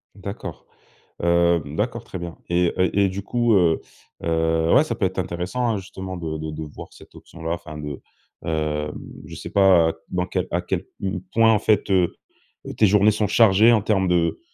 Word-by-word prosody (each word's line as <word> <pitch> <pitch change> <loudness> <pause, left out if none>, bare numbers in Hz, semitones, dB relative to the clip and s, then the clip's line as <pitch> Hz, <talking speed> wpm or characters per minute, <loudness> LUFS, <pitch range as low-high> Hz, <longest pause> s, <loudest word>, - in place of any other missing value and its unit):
D'accord. - - -8 0.6
Hem, 85 -3 +2
d'accord 115 +2 -2
très 95 - -7
bien 85 -1 -7
et, 85 0 +2
heu 95 0 +3
et 100 - +4
du 95 +1 -4
coup, 120 +2 +1
heu 85 -4 +3 0.4
heu, 80 0 +1
ouais, 145 - +6
ça 155 - -3
peut 95 - 0
être 95 0 -2
intéressant, 90 +8 -2
hein, 110 - 0
justement 95 -1 -7
de 80 -2 -4
de 80 0 -5
de 80 +1 -6
voir - - -10
cette - - -17
option-là, 80 -1 -7
enfin 85 -3 -6
de 75 -2 -6 0.4
hem, 75 -2 -2 0.3
je 80 +1 -10
sais - - -7
pas 95 -5 +4 0.2
dans 90 0 -1
quel 90 0 -2
à 85 - +1
quel 90 +1 -3 0.5
point, 115 0 +5
en 105 - +2
fait, 105 -2 +1
heu, 90 -3 +2 0.6
tes 110 - +5
journées 105 +2 +4
sont 105 0 0
chargées 110 +1 +5
en 110 -3 +4
termes 95 -3 +1
de, 85 -2 +1
90 Hz, 190 wpm, -22 LUFS, 80-100 Hz, 0.6 s, ouais